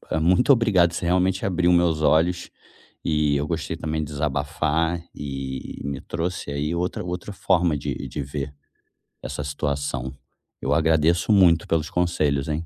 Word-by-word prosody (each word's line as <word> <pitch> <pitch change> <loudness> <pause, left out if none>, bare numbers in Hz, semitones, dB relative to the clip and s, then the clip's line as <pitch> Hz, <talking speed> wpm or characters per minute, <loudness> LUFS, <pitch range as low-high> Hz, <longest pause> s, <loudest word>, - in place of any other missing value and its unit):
eh, - - +1
muito 90 - +4
obrigado, 100 -8 +3
você 85 - -3
realmente 90 +2 +1
abriu 90 -2 +2
meus 85 -3 +3
olhos. 85 +3 +2 0.6
E 75 -2 +2
eu 70 +1 -1
gostei 80 0 -3
também 80 -1 -2
de 75 - -9
desabafar 80 +3 -1
e 70 -2 -6
me 70 -1 -3
trouxe 85 -2 -3
aí 75 +3 -2
outra 90 +1 -2
outra 90 +3 -5
forma 90 -5 +2
de 70 - -3
de 75 - -4
ver 70 0 -5 0.7
essa 75 - -4
situação. 70 -2 -3 0.5
Eu 70 - 0
agradeço 80 +3 +3
muito 90 -5 +5
pelos 80 -2 0
conselhos, 75 -6 0
hein. 80 +2 -2
80 Hz, 150 wpm, -24 LUFS, 70-90 Hz, 0.7 s, muito